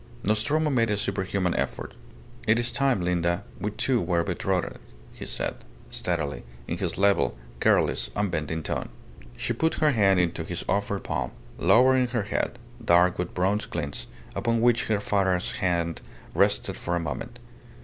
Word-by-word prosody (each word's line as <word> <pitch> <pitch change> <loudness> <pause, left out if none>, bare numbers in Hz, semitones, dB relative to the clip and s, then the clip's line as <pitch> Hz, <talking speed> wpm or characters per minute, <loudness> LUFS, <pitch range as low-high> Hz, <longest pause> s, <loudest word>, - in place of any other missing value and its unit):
Nostromo 145 +9 +1
made 115 -4 +2
a 105 - +1
superhuman 95 -2 -1
effort. - - -3 0.5
"It 110 +1 +5
is 120 0 +2
time, 135 -4 +2
Linda, 85 +1 0 0.2
we 105 - -1
two 120 +3 0
were 85 -1 +1
betrothed," - - -1 0.3
he - - -8
said, - - -3 0.3
steadily, 75 -7 -2 0.2
in - - -3
his - - -2
level, 100 -9 +3 0.2
careless, - - +2
unbending 80 -5 -1
tone. - - -3 0.5
She 120 - -1
put 160 +7 +1
her 155 -1 +3
hand 100 -6 +4
into 85 -2 0
his 85 +1 -4
offered 100 0 0
palm, - - -2 0.3
lowering 130 +1 +5
her 120 -3 -1
head, 110 +3 -2 0.3
dark 90 -2 +4
with 90 - -3
bronze 95 +4 +1
glints, 70 -7 -4 0.3
upon 115 -1 +1
which 120 0 +3
her 110 -2 +1
father's 95 -3 +1
hand 85 -3 -1 0.3
rested - - +2
for 85 - -2
a - - +1
moment. 80 -3 -5
100 Hz, 155 wpm, -26 LUFS, 85-115 Hz, 0.5 s, It